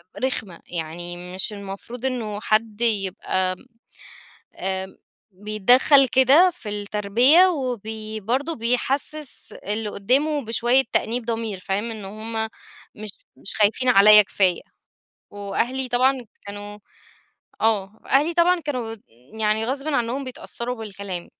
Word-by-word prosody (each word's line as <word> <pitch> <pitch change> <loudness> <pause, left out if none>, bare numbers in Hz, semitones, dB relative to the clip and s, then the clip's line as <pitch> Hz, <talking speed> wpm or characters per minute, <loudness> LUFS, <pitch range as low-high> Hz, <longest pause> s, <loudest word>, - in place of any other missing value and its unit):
آآ - - -8
رخمة 210 -9 -2
يعني، 175 +2 -6
مش 190 +3 -2
المفروض 200 +5 -7
إنه 220 -5 -2
حد 215 0 0
يبقى 190 -4 +1 1.0
آآ 190 0 -4 0.4
بيتدخل 215 +8 +4
كده 270 +9 +5
في 230 -11 -8
التربية، 210 - +3
وبي 220 - -4
برضه 260 +10 -1
بيحسس 265 +5 -1
اللي 210 +1 -3
قدامه 270 +7 +1
بشوية 240 +4 +3
تأنيب 235 +1 0
ضمير 225 -4 -3
فاهم، 200 +5 -3
إن 215 -3 -7
هُم 220 +2 -3 0.5
مش 215 0 -7 0.3
مش - - -4
خايفين 220 +5 +2
عليّا 210 -1 +8
كفاية، 190 -3 +1 0.7
وأهلي 235 +6 -2
طبعًا 255 0 +1 0.2
كانوا 205 +1 -7 0.8
آه، 215 -1 0
أهلي 295 +5 +2
طبعًا 355 +1 +3
كانوا 250 -7 -4 0.4
يعني 215 +1 +1
غصبًا 275 +3 -1
عنهم 245 +4 -2
بيتأثّروا 250 -1 -5
بالكلام. 200 -5 -7
220 Hz, 115 wpm, -23 LUFS, 205-255 Hz, 1.0 s, عليّا